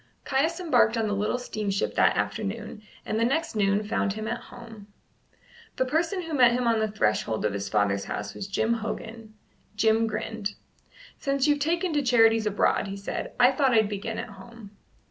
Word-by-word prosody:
Caius 315 +6 0
embarked 245 -9 +3
on 225 - +1
the 205 - -1
little 210 +4 0
steamship 210 -5 -2
that - - +3
afternoon, 215 +1 -3 0.2
and 215 - -1
the - - +2
next 315 +4 0
noon 200 0 +2
found 210 -1 -1
him 215 +1 -5
at - - -2
home. 225 -4 -12 0.9
The 260 - +1
person 330 +7 0
who 325 -1 -6
met 245 -4 +5
him 250 0 0
on 230 -1 +3
the 220 - +1
threshold 110 - 0
of 105 - 0
his 100 0 -4
father's 100 -1 +1
house 105 0 -5
was 195 - -6
Jim 220 +3 0
Hogan. 225 0 -6 0.4
Jim 220 +1 +3
grinned. 215 -1 -4 0.6
"Since 275 -1 0
you've 295 -1 +3
taken 335 +4 0
to 295 - +2
charities 225 -4 +4
abroad," 205 0 +1
he 195 +1 -5
said, 200 - -5
"I 250 +1 +7
thought 265 -1 +2
I'd 220 -2 +4
begin 210 +2 -4
at - - -5
home." 205 +1 -13
225 Hz, 185 wpm, -26 LUFS, 205-250 Hz, 0.9 s, I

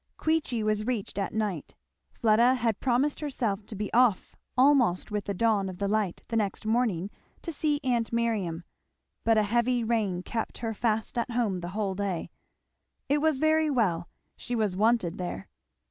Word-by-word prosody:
Queechy 305 -8 0
was 215 +1 0
reached 220 -5 -2
at 195 - -1
night. 210 -8 -3 0.4
Fleda 235 +3 +4
had 230 -4 0
promised 265 +3 +1
herself 230 -9 -2
to 215 - -7
be 205 0 -4
off 240 -5 +3 0.2
almost 250 -9 +4
with 210 -1 -2
the 200 - -2
dawn 205 -2 +2
of 180 - -9
light 200 -2 -1
the 230 - -2
next 210 -1 -1
morning 215 -5 0 0.3
to 335 - -4
see 295 -1 0
aunt 240 -3 0
Miriam, 215 -8 -1 0.6
but 225 -1 +3
a 215 - +4
heavy 240 +3 +1
rain 210 -6 0
kept 225 +3 -3
her 225 -1 -3
fast 220 +1 -1
at 235 - -2
home 230 -6 0
the 175 0 -5
whole 200 -3 0
day. 190 -3 -3 0.8
It 290 +1 +3
was 315 -3 +2
very 315 +1 +3
well; 185 - 0 0.3
she 245 - -4
was 210 -5 0
wanted 210 -4 +1
there. 175 - -5
220 Hz, 170 wpm, -28 LUFS, 200-245 Hz, 0.8 s, Fleda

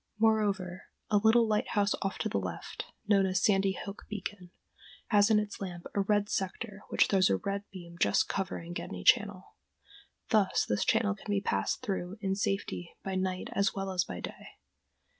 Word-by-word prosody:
Moreover, 205 -5 +1 0.3
a 210 - +5
little 220 +3 +5
lighthouse 210 -1 +1
off 195 -1 -2
to - - -1
the - - 0
left, - - -5 0.2
known 200 -2 +4
as 185 -1 0
Sandy 195 -2 +3
Hook 200 0 -8
Beacon, 205 -3 -6 0.6
has 205 -1 +5
in 220 - +5
its 210 -1 -2
lamp 175 -3 -6
a 200 - +2
red 205 +1 +2
sector 200 +1 -3
which - - +4
throws 190 -2 +3
a 95 - +3
red 200 - -3
beam 170 -3 -10
just 100 - +3
covering 175 -3 -3
Gedney 90 - -5
Channel. 205 -5 +3 0.8
Thus 210 -4 +3
this 105 - 0
channel 220 -2 +3
can 205 +1 -12
be 200 - +2
passed 95 - -1
through 190 0 -3
in 195 -2 -1
safety 195 -3 -2
by 195 - -3
night 185 -1 -2
as 200 0 +1
well 195 -1 -2
as 180 -1 +2
by 90 - -7
day. - - -8
195 Hz, 180 wpm, -31 LUFS, 185-210 Hz, 0.8 s, a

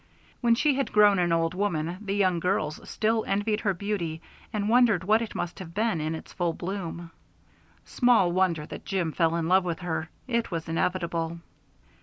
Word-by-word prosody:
When 235 -1 +3
she 295 +4 +3
had 275 0 -1
grown 210 -2 +5
an 175 -1 +1
old 165 0 +1
woman 180 -3 -1
the 200 -2 -2
young 185 -4 +2
girls 155 -3 -2
still 220 0 +1
envied 205 +2 0
her 205 -3 0
beauty, 175 -5 -3 0.3
and 205 -1 -1
wondered 225 -5 +4
what 215 +4 +3
it 230 - -5
must 175 - -4
have 170 -3 -9
been 215 -6 +1
in 155 +1 -2
its - - -10
first 170 -2 -1
bloom. 175 -3 -5 0.7
Small 240 -8 +3
wonder 175 -4 +1
that - - -9
Jim 185 -5 -1
fell 165 0 +1
in 165 -1 -1
love 185 +2 +4
with 170 -2 -3
her; 160 -2 -3 0.2
it 235 -2 0
was 165 -2 -4
inevitable. 170 0 -1
185 Hz, 185 wpm, -27 LUFS, 165-210 Hz, 0.7 s, grown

